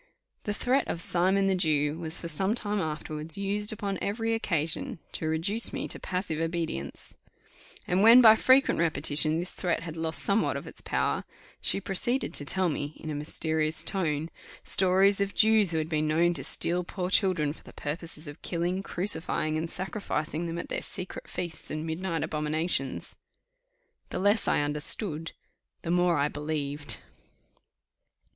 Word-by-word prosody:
The 210 Hz, -, -1 dB
threat 260 Hz, +5 st, +1 dB
of 170 Hz, -, -3 dB
"Simon 185 Hz, +3 st, +1 dB
the 195 Hz, -, +2 dB
Jew" 155 Hz, -4 st, +1 dB
was 160 Hz, 0 st, 0 dB
for 170 Hz, -, -5 dB
some 190 Hz, +7 st, 0 dB
time 210 Hz, -3 st, -1 dB
afterwards 155 Hz, 0 st, -4 dB
used 205 Hz, +1 st, 0 dB
upon 200 Hz, -3 st, -3 dB
every 225 Hz, +2 st, -1 dB
occasion 165 Hz, -9 st, -1 dB
to 160 Hz, -, -3 dB
reduce 180 Hz, +9 st, 0 dB
me -, -, -4 dB
to -, -, -2 dB
passive 180 Hz, -4 st, -3 dB
obedience; 165 Hz, -, -4 dB, 0.7 s
and 180 Hz, +2 st, +2 dB
when 230 Hz, +4 st, +9 dB
by 220 Hz, -3 st, +9 dB
frequent 260 Hz, 0 st, +4 dB
repetition 155 Hz, -1 st, +4 dB
this 175 Hz, -, -4 dB
threat 175 Hz, -2 st, -1 dB
had 165 Hz, -2 st, -6 dB
lost 160 Hz, -1 st, -3 dB
somewhat 205 Hz, +2 st, +1 dB
of -, -, -7 dB
its -, -, -3 dB
power, -, -, -1 dB, 0.4 s
she -, -, +2 dB
proceeded 220 Hz, +7 st, 0 dB
to 145 Hz, -, 0 dB
tell 185 Hz, +5 st, +1 dB
me, 145 Hz, -1 st, -4 dB
in 155 Hz, -, -6 dB
a -, -, -3 dB
mysterious 155 Hz, +1 st, 0 dB
tone, 160 Hz, -4 st, -1 dB, 0.3 s
stories 195 Hz, +2 st, +4 dB
of 200 Hz, 0 st, -1 dB
Jews 220 Hz, -3 st, +5 dB
who 165 Hz, -, +1 dB
had 155 Hz, 0 st, -1 dB
been 155 Hz, -1 st, 0 dB
known 170 Hz, +3 st, +3 dB
to 140 Hz, -5 st, -5 dB
steal 175 Hz, +6 st, +1 dB
poor 180 Hz, +1 st, -4 dB
children 180 Hz, -8 st, +2 dB
for -, -, -16 dB
the -, -, -14 dB
purpose 155 Hz, +1 st, -4 dB
of 145 Hz, -, -10 dB
killing, 175 Hz, +2 st, -2 dB
crucifying, 175 Hz, -5 st, -1 dB
and 160 Hz, +1 st, -2 dB
sacrificing 170 Hz, -4 st, -3 dB
them 165 Hz, 0 st, -4 dB
at 170 Hz, -, -6 dB
their -, -, -1 dB
secret 185 Hz, -1 st, -5 dB
feasts 170 Hz, -3 st, -5 dB
and 155 Hz, +1 st, -3 dB
midnight 165 Hz, 0 st, -2 dB
abominations. 150 Hz, -2 st, -2 dB, 0.9 s
The -, -, -4 dB
less 205 Hz, +3 st, +2 dB
I -, -, +3 dB
understood, 150 Hz, +3 st, 0 dB, 0.5 s
the 165 Hz, -, -2 dB
more 175 Hz, -1 st, +3 dB
I 145 Hz, +1 st, +2 dB
believed. 150 Hz, -1 st, -3 dB
170 Hz, 165 wpm, -28 LUFS, 155-195 Hz, 0.9 s, when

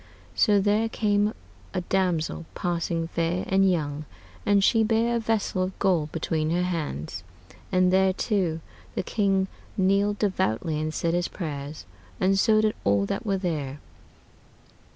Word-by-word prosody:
So 205 Hz, -3 st, +4 dB
there 210 Hz, +3 st, +2 dB
came 210 Hz, -1 st, +1 dB, 0.4 s
a 185 Hz, -, 0 dB
damosell, 175 Hz, -3 st, 0 dB
passing 170 Hz, -1 st, -1 dB
faire 170 Hz, +2 st, -1 dB
and 195 Hz, 0 st, +4 dB
young, 155 Hz, -4 st, -1 dB, 0.4 s
and 200 Hz, -1 st, +4 dB
she 225 Hz, +2 st, +4 dB
beare 230 Hz, +2 st, +2 dB
a -, -, 0 dB
vessell 220 Hz, -4 st, 0 dB
of 185 Hz, +1 st, -2 dB
gold 165 Hz, -6 st, +1 dB
between 155 Hz, -1 st, -1 dB
her 175 Hz, +2 st, +1 dB
hands, 160 Hz, -, -3 dB, 0.5 s
and 185 Hz, 0 st, +3 dB
thereto 190 Hz, -3 st, +1 dB, 0.3 s
the -, -, -1 dB
king 195 Hz, -2 st, +1 dB, 0.3 s
kneeled 200 Hz, +2 st, +2 dB
devoutly 165 Hz, -, 0 dB
and 155 Hz, 0 st, -2 dB
said 165 Hz, +1 st, -1 dB
his 175 Hz, 0 st, +1 dB
prayers, 150 Hz, -3 st, -6 dB, 0.3 s
and 195 Hz, +1 st, +3 dB
so 215 Hz, +1 st, +4 dB
did 215 Hz, 0 st, +2 dB
all 100 Hz, 0 st, +3 dB
that 220 Hz, -, -3 dB
were 195 Hz, -1 st, +1 dB
there. 150 Hz, -7 st, -3 dB
185 Hz, 145 wpm, -26 LUFS, 165-205 Hz, 0.5 s, So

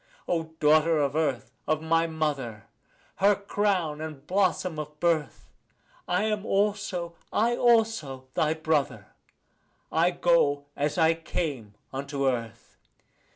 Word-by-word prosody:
O 160 Hz, -2 st, -2 dB
daughter 155 Hz, +2 st, +4 dB
of 140 Hz, -1 st, 0 dB
earth, 150 Hz, -6 st, -1 dB, 0.2 s
of 155 Hz, 0 st, +2 dB
my 165 Hz, +1 st, +2 dB
mother, 140 Hz, -10 st, -3 dB, 0.5 s
her 200 Hz, +1 st, +4 dB
crown 195 Hz, -6 st, -1 dB
and 155 Hz, -3 st, -7 dB
blossom 185 Hz, -3 st, 0 dB
of 150 Hz, 0 st, -7 dB
birth, 165 Hz, -3 st, 0 dB, 0.6 s
I -, -, +1 dB
am 215 Hz, -2 st, -1 dB
also, 200 Hz, -5 st, -1 dB, 0.2 s
I 235 Hz, +3 st, +2 dB
also, 220 Hz, -, +2 dB
thy 155 Hz, 0 st, +1 dB
brother; 155 Hz, -3 st, -1 dB, 0.8 s
I 165 Hz, +2 st, +3 dB
go 165 Hz, -5 st, +2 dB
as 145 Hz, +3 st, -1 dB
I 165 Hz, -1 st, +5 dB
came 145 Hz, -10 st, -4 dB, 0.2 s
unto 140 Hz, 0 st, -2 dB
earth. 115 Hz, -3 st, -4 dB
160 Hz, 120 wpm, -27 LUFS, 145-180 Hz, 0.8 s, I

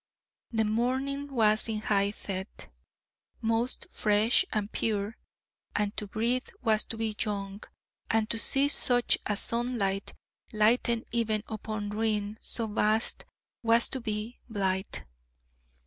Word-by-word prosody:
The 225 Hz, -2 st, +1 dB
morning 260 Hz, +6 st, 0 dB
was 215 Hz, -4 st, +3 dB
in 215 Hz, -1 st, -2 dB
high 200 Hz, -2 st, +2 dB
fête, 195 Hz, -1 st, -6 dB, 0.7 s
most 230 Hz, +2 st, +1 dB
fresh 210 Hz, +2 st, +4 dB
and 210 Hz, -1 st, -1 dB
pure, 210 Hz, 0 st, -1 dB, 0.6 s
and 205 Hz, 0 st, 0 dB
to 210 Hz, -, -3 dB
breathe 235 Hz, +5 st, 0 dB, 0.2 s
was 220 Hz, -3 st, +3 dB
to 225 Hz, -, -4 dB
be 220 Hz, -1 st, -1 dB
young, 200 Hz, -1 st, -4 dB, 0.5 s
and 220 Hz, -1 st, +2 dB
to 230 Hz, -, +1 dB
see 275 Hz, +4 st, +3 dB
such 245 Hz, -4 st, +2 dB
a 210 Hz, -, 0 dB
sunlight 230 Hz, -5 st, -1 dB, 0.4 s
lighten 230 Hz, +2 st, +3 dB
even 220 Hz, -2 st, +1 dB
upon 215 Hz, -1 st, -4 dB
ruin 215 Hz, -1 st, 0 dB
so 230 Hz, -, 0 dB
vast 215 Hz, +1 st, +1 dB, 0.4 s
was 230 Hz, 0 st, +4 dB
to 260 Hz, -, -2 dB
be 215 Hz, +1 st, -4 dB
blithe. 190 Hz, -3 st, -1 dB
220 Hz, 125 wpm, -29 LUFS, 210-230 Hz, 0.7 s, fresh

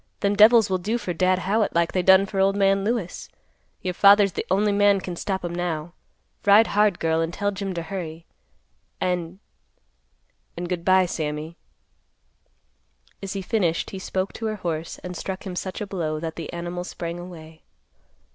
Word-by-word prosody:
Them 200 Hz, 0 st, +1 dB
devils 220 Hz, +1 st, +7 dB
will 185 Hz, -1 st, -1 dB
do 215 Hz, +6 st, -1 dB
for 185 Hz, -6 st, -4 dB
Dad 185 Hz, +2 st, +2 dB
Howitt 200 Hz, +2 st, 0 dB
like 170 Hz, 0 st, +2 dB
they 185 Hz, -, +1 dB
done 190 Hz, +2 st, +6 dB
for 195 Hz, 0 st, -4 dB
old 195 Hz, +1 st, +3 dB
man 195 Hz, -1 st, +2 dB
Lewis. 215 Hz, -4 st, -3 dB, 0.5 s
Your 180 Hz, -, -2 dB
father's 200 Hz, +1 st, +6 dB
the -, -, -5 dB
only 205 Hz, +2 st, +2 dB
man 200 Hz, -1 st, +4 dB
can 180 Hz, -1 st, -6 dB
stop 190 Hz, +1 st, -3 dB
'em 170 Hz, -, -4 dB
now. 170 Hz, -2 st, -3 dB, 0.5 s
Ride 205 Hz, +2 st, +6 dB
hard, 205 Hz, -3 st, +2 dB
girl, 160 Hz, 0 st, +1 dB
and 165 Hz, 0 st, -1 dB
tell 205 Hz, +3 st, -1 dB
Jim 195 Hz, -1 st, -4 dB
to 170 Hz, -, -3 dB
hurry. 165 Hz, -2 st, -6 dB, 0.7 s
And—and, 170 Hz, -, -8 dB
good 175 Hz, -1 st, -3 dB
by, 185 Hz, 0 st, +4 dB
Sammy." 155 Hz, -1 st, -4 dB, 1.7 s
As 195 Hz, -1 st, -5 dB
he 195 Hz, -1 st, -4 dB
finished, 180 Hz, -5 st, 0 dB
he 195 Hz, -, -6 dB
spoke 190 Hz, 0 st, -3 dB
to 225 Hz, -, -4 dB
her 215 Hz, -, -2 dB
horse 165 Hz, -4 st, -4 dB
and 180 Hz, 0 st, -6 dB
struck 190 Hz, +3 st, -5 dB
him 185 Hz, -2 st, -5 dB
such 185 Hz, +2 st, -5 dB
a -, -, -2 dB
blow 165 Hz, -6 st, -3 dB
that 160 Hz, 0 st, -5 dB
the 165 Hz, -, -6 dB
animal 175 Hz, +1 st, -5 dB
sprang 170 Hz, -1 st, -6 dB
away. 160 Hz, -3 st, -11 dB
185 Hz, 175 wpm, -24 LUFS, 170-200 Hz, 1.7 s, devils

